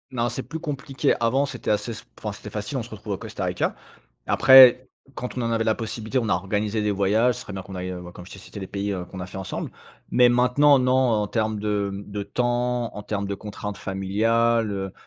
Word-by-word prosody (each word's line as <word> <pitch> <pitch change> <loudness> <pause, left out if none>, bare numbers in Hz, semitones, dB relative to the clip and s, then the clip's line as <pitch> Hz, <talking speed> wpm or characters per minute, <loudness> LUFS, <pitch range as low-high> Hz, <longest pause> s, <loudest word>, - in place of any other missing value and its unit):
Non, 120 -2 0
c'est 125 +2 -4
plus 160 +5 -6
compliqué. 140 -2 -1
Avant, 130 +5 +2
c'était 125 -6 -3
assez 105 +2 -1
s 115 - -9
enfin, 105 -2 -4
c'était 105 +1 -10
facile. 105 +6 -4
On 125 - -2
se 115 - -11
retrouve 105 -1 -6
au - - -3
Costa - - -5
Rica. - - -1 0.5
Après, 130 -1 +8 0.3
quand 125 +1 -6
on 125 - -1
en 115 - -1
avait 115 -1 +1
la 110 -1 +2
possibilité, 110 +2 -3
on 115 -3 -1
a - - +3
organisé 105 +4 -1
des 105 0 +1
voyages, 105 +5 +2
ce - - -8
serait - - -9
bien 95 -1 -5
qu'on 95 +1 -10
aille, 90 0 -4
heu, 90 -1 -6
bah 90 0 -10
comme 90 - -10
je 95 - -14
t'ai - - -10
cité, 100 - -10
les 95 - -6
pays, 100 0 -3
heu, 90 -2 -4
qu'on 95 - -10
a 90 - -5
fait 95 - -10
ensemble. 95 -1 -5 0.4
Mais, 125 -1 +6
maintenant, 125 +4 +4
non, 125 0 +2
en 120 -5 +2
termes 110 0 -1
de, 105 -1 -1
hem, 100 +1 -7
de 100 0 -4
temps, 120 +2 -1
en 105 - -6
termes 100 -1 -3
de 100 - -3
contraintes 105 0 -7
familiales, 110 +4 +1
heu, 95 -1 -4
110 Hz, 245 wpm, -24 LUFS, 100-125 Hz, 0.5 s, Après